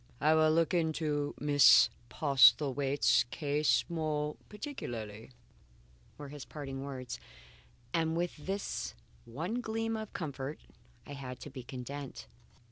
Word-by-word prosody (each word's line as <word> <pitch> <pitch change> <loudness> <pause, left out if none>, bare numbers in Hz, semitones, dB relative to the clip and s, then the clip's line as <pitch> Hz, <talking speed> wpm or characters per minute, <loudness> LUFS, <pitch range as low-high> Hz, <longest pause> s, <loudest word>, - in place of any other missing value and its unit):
"I 155 +1 +4
will 155 0 +5
look 165 +1 +2
into 155 -3 0
Miss 145 -1 +7 0.2
Postlethwaite's 135 -1 +4
case 150 +1 +1
more 155 -3 -2
particularly," 115 - -6 0.9
were 145 -1 -8
his 145 -1 -8
parting 135 -3 -6
words. 130 - -6 0.7
And 165 0 +1
with 175 0 -1
this 195 +6 -4 0.3
one 165 - -3
gleam 225 0 -2
of 220 -1 -5
comfort 140 -3 -5 0.5
I 145 - -8
had 130 -3 -7
to 145 - -8
be 130 -1 -7
content. 130 +3 -7
145 Hz, 120 wpm, -32 LUFS, 135-160 Hz, 0.9 s, Miss